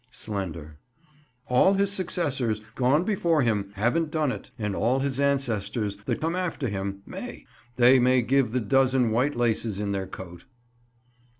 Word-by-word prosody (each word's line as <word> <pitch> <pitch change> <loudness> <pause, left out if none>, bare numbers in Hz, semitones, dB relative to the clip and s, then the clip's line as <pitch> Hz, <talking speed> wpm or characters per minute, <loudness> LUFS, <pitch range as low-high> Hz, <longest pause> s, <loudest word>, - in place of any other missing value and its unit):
Slender. 85 -10 -6 0.7
All 125 +10 +4
his 200 0 +1
successors, 145 - 0
gone 135 +7 +2
before 170 -7 +1
him, 105 -4 0
have 125 +10 +1
done't; 150 -4 -2
and 105 -4 -3
all 125 +4 +1
his 135 -1 -1
ancestors, 115 -7 0
that - - -1
come 165 +3 -1
after 170 -8 -2
him, 100 0 -4
may; - - -8 0.3
they 125 +1 +6
may 125 0 +3
give 130 -1 +2
the 125 +1 0
dozen 130 0 +2
white 130 +6 +1
laces 115 -3 0
in 105 -1 -2
their 95 -1 -2
coat. 90 -2 -10
125 Hz, 145 wpm, -26 LUFS, 105-140 Hz, 0.7 s, they